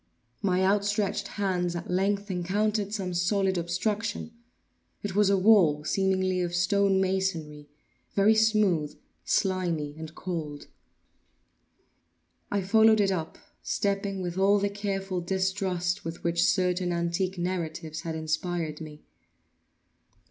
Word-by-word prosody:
My 185 -1 +1
outstretched 205 +1 +1
hands 180 -4 -1
at 170 +1 -5
length 200 +2 0
encountered 205 +3 0
some 190 -4 -3
solid 190 +2 +1
obstruction. 205 +6 -2 0.7
It 205 -2 -3
was 205 -1 +4
a 200 - +4
wall, 185 -7 +5
seemingly 185 +1 +1
of 175 -1 -2
stone 195 +2 +2
masonry—very 185 +1 -1
smooth, 210 -9 +2 0.3
slimy, 175 -7 0
and 160 0 -8
cold. 155 -5 -5 1.8
I 200 -1 -1
followed 220 +2 +5
it 200 -1 +3
up; 165 -4 -3 0.2
stepping 195 -1 -1
with 175 +1 -3
all 200 +1 +5
the 200 0 0
careful 195 -2 -3
distrust 190 0 -1
with 165 +1 -6
which 170 0 +1
certain 180 -1 +1
antique 170 +2 -1
narratives 165 -3 -3
had 165 -1 -4
inspired 160 0 -2
me. 150 -1 -10
185 Hz, 115 wpm, -27 LUFS, 170-200 Hz, 1.8 s, wall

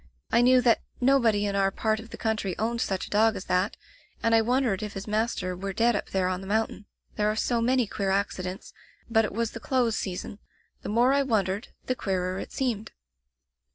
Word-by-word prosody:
I 235 - +5
knew 250 +1 +6
that 235 -2 +3 0.2
nobody 235 -6 +3
in 200 -1 -1
our 195 0 +3
part 215 +2 0
of 225 +1 -11
the - - -9
country 215 -5 -1
owned 230 +2 -1
such 190 -6 -1
a - - -12
dog 220 +1 +4
as 190 - -6
diat, 180 +3 +1 0.5
and 230 - +3
I 225 - +6
wondered 240 -4 +1
if 210 -1 -5
his 195 0 -6
master 210 -4 -1
were 195 +2 -4
dead 235 +3 +3
up - - -3
there 190 -1 +1
on 185 0 -2
the 190 - -8
mountain. 210 0 -1 0.3
There 210 -1 +2
are 215 - 0
so 235 +1 0
many 250 +1 +2
queer 200 -1 -2
accidents 190 -1 -2 0.2
— - - -32
but 225 -1 +4
it - - -4
was 230 +2 -1
the 230 - -7
close 240 -2 +1
season. 190 +2 -4 0.4
The - - -6
more 240 +5 +4
I 280 - +3
wondered, 210 -5 0 0.2
the 255 - 0
queerer 185 -5 -2
it - - -7
seemed. 235 -5 -2
215 Hz, 220 wpm, -27 LUFS, 195-235 Hz, 0.5 s, knew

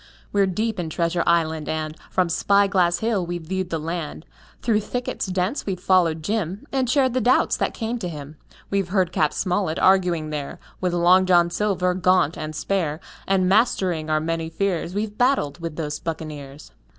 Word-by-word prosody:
We're 200 -1 +3
deep 215 +3 -2
in 165 -2 -3
Treasure 170 +2 0
Island, 160 -2 +1
and 155 0 -3
From 185 -1 +1
Spy 200 +4 +3
Glass 180 -3 +2
Hill 215 -5 +1
we've 175 -1 -4
viewed 185 +2 -3
the 165 - -1
land; 160 0 -5 0.4
Through 225 -3 +2
thickets 245 +1 -3
dense 185 +8 -2
we've 190 -2 -2
followed 170 -4 +2
Jim 205 - -2
And 260 -3 0
shared 260 -1 +3
the 255 - +1
doubts 250 +3 +3
that - - -1
came 235 +1 -3
to 180 -5 -3
him. 150 -1 -9 0.3
We've 195 -3 0
heard 185 -3 +1
Cap. 155 -1 +2
Smollett 180 -3 -1
arguing 180 -5 +3
there 145 -2 -4 0.2
With 180 -1 -1
Long 180 +2 +4
John 175 -1 +4
Silver, 185 -2 0
gaunt 180 -3 +2
and 155 -2 -6
spare, 160 -4 -1 0.3
And 190 -1 +2
mastering 185 -6 +2
our 155 0 +2
many 165 +1 -2
fears 180 0 -2
We've 210 0 -2
battled 245 - +1
with 165 -2 -5
those 150 -2 -3
buccaneers. 150 -3 -7
180 Hz, 180 wpm, -23 LUFS, 160-200 Hz, 0.4 s, Long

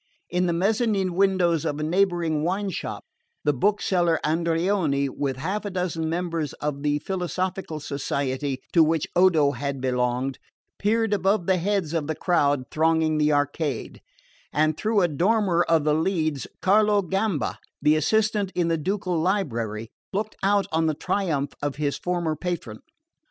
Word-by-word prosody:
In 180 +1 +1
the - - +1
mezzanin 200 0 +1
windows 180 -4 +2
of 150 -2 -2
a - - -2
neighbouring 170 -2 +1
wine 190 +3 -1
shop - - -5 0.4
the 145 - +2
bookseller 175 0 +1
Andreoni, 165 -2 +1
with 135 -1 -3
half 190 +10 -2
a 205 - -3
dozen 180 -4 -2
members 165 -3 -2
of 145 -1 -4
the 145 0 +1
philosophical 180 -1 -3
society 140 -1 -3
to 165 - +7
which 160 -1 +1
Odo 170 -6 +5
had 140 -1 -4
belonged, 125 +1 -1 0.4
peered 225 +1 +1
above 195 -1 +1
the 190 0 +3
heads 185 -3 -1
of 160 -3 -1
the 155 - -2
crowd 145 -6 +2
thronging 160 0 +2
the 150 0 +3
arcade, 145 -2 -1 0.5
and 155 0 +2
through 215 +3 +1
a 175 - +4
dormer 180 +2 +2
of 165 -2 +4
the 150 0 +2
leads 155 -3 0 0.2
Carlo 205 +1 +4
Gamba, 190 -2 -1 0.2
the 150 +1 +4
assistant 210 +4 +1
in 175 -2 +1
the 165 -1 +1
ducal 185 0 -1
library, 115 - -1 0.2
looked 210 +2 -3
out 200 +1 +3
on 160 0 +2
the 155 - 0
triumph 150 -6 -1
of 145 -1 -2
his 145 -1 -2
former 175 -3 -1
patron. 155 -10 -4
165 Hz, 155 wpm, -25 LUFS, 150-190 Hz, 0.5 s, to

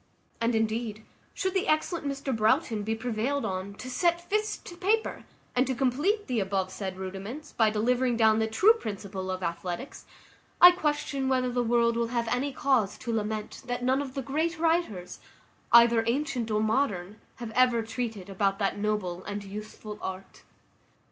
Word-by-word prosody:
And, 230 0 +2
indeed, 220 -1 -1 0.3
should 380 -1 -1
the 380 -1 0
excellent 310 0 0
Mr 275 -2 -2
Broughton 220 +1 +2
be 220 +2 -1
prevailed 245 +4 -1
on 190 +1 -4
to 255 - -8
set 340 +6 +1
fist 425 +1 -1
to 350 - -9
paper, 420 +5 0 0.3
and 250 +1 +3
to 260 - -1
complete 290 - +1
the 250 -4 -1
above 190 -1 -1
said 190 -1 -5
rudiments, 195 +11 -7
by 220 -2 +3
delivering 240 +3 +1
down 220 -1 +4
the 220 - +1
true 380 - +5
principles 200 - -5
of 185 0 -3
athletics, 175 +8 -4 0.5
I 355 - +11
question 295 -5 -1
whether 255 -1 +1
the 245 0 0
world 235 0 +2
will 235 0 +1
have 235 -1 -1
any 260 +4 0
cause 260 -8 +1
to 235 - -4
lament, 215 -1 -3
that 245 0 -2
none 260 +2 +2
of 265 -2 -7
the 270 - -2
great 315 +6 -1
writers, 320 - 0 0.5
either 235 -1 +7
antient 250 -2 -1
or 215 0 +1
modern, 215 -4 -1
have 235 -2 -7
ever 245 -1 +3
treated 225 -4 -4
about 195 0 0
that 200 0 -1
noble 200 -4 -2
and 205 0 -4
useful 210 +1 -8
art. 190 0 -7
235 Hz, 170 wpm, -28 LUFS, 210-275 Hz, 0.5 s, I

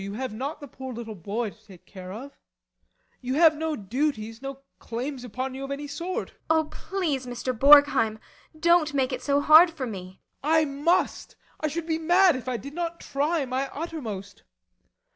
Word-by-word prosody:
You 200 +1 -5
have 255 +1 -4
not 270 +7 -4
the 290 - -9
poor 265 0 -8
little 230 -2 -6
boy 205 +4 -3
to 215 +1 -23
take 185 -4 -15
care 185 -2 -10
of 255 +8 -8
now. - - -35 0.8
You 255 +1 -2
have 320 0 +6
no 320 0 -2
duties 225 0 -2
no 275 0 -7 0.2
claims 250 +3 -5
upon 255 +3 -4
you 265 +1 -6
of 275 - -5
any 280 +1 -4
sort. 335 +6 -4
ASTA. - - -33
Oh, 320 0 +4
please, 310 -7 -3
Mr. 245 +1 -3
Borgheim 275 -4 +6 0.4
don't 335 -3 +3
make 265 -2 +1
it - - -3
so 285 0 +2
hard 315 +4 +8
for 315 -5 -5
me. 190 -4 -8 0.2
BORGHEIM. 315 +3 +3
I 315 - +4
must; 295 +5 0 0.2
I 310 - 0
should 320 +2 -3
be 320 -1 -1
mad 350 +1 +5
if 255 -1 -5
I 250 - -1
did 280 +4 -9
not 340 0 -3
try 290 +2 -1
my 260 +2 -2
uttermost. 230 - -6
275 Hz, 195 wpm, -26 LUFS, 235-315 Hz, 0.8 s, hard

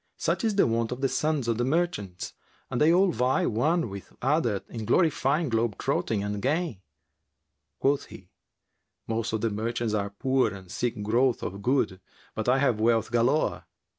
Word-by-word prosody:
Such - - -1
is 220 -3 +1
the 200 - +5
wont 115 0 0
of 125 +1 -4
the 135 - +3
sons 150 -2 0
of 115 -1 0
the - - +2
merchants 130 - -1 0.4
and 120 - -1
they 155 +2 +6
all 185 +2 +4
vie 125 +3 +1
one 155 +9 +1
with 100 -1 -9
other 125 -7 +1
in 115 -2 -6
glorifying 150 - +2
globe 115 -4 0
trotting 105 -3 -1
and 105 0 -3
gain." 150 - -1 1.0
Quoth 140 +1 +1
he, 95 -1 -14 0.7
"Most 115 0 -2
of 110 -1 -2
the 115 - 0
merchants 115 +1 -2
are 100 -1 0
poor 130 +2 +1
and 95 -2 -12
seek 120 -3 -2
growth 120 +4 +2
of 100 +2 -5
good; 110 -6 0 0.3
but 110 +2 -2
I 130 - +4
have 125 -5 +2
wealth 115 0 +2
galore." 120 +6 +1
120 Hz, 175 wpm, -27 LUFS, 110-140 Hz, 1.0 s, they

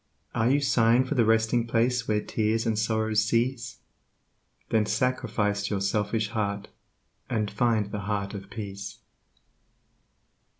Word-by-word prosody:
Are 115 +1 +2
you 140 +2 +3
sighing 120 -1 +3
for 130 - -2
the 120 -5 +3
Resting 110 +1 +2
Place 120 +1 +1
where 105 -1 +1
tears 110 +1 0
and 110 -2 0
sorrows 110 -1 +1
cease? 115 +2 -1 0.9
Then 110 -2 +2
sacrifice 105 -5 0
your 100 - -1
selfish 105 +2 0
heart 105 -2 -2 0.6
and 110 -4 -1
find 110 -1 +1
the 105 - -3
Heart 100 0 -3
of 100 -1 -8
Peace. 100 -2 -7
110 Hz, 130 wpm, -27 LUFS, 105-115 Hz, 0.9 s, you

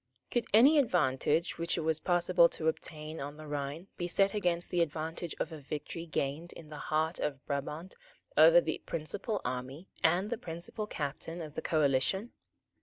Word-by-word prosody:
Could 240 -2 0
any 275 +8 +7
advantage 165 - +1
which 170 +1 0
it - - 0
was 160 0 +1
possible 175 0 +4
to 160 - -2
obtain 155 0 -3
on 145 +2 -6
the 155 - -9
Rhine 145 +3 -4
be 175 - -2
set 195 +2 +3
against 175 -4 0
the 175 - +2
advantage 165 +1 -3
of - - -2
a 160 - -7
victory 150 +4 -6
gained 155 +2 -2
in 155 - -12
the 150 -1 -8
heart 160 +2 +1
of 140 -2 -3
Brabant 150 +5 -4 0.4
over - - +8
the - - -2
principal 195 +7 -3
army 130 +7 -4
and 185 +7 +3
the 235 - -2
principal 170 +6 -5
captain 155 +1 -4
of 155 -3 -7
the - - -4
coalition? 155 - +1
160 Hz, 175 wpm, -32 LUFS, 150-180 Hz, 0.4 s, over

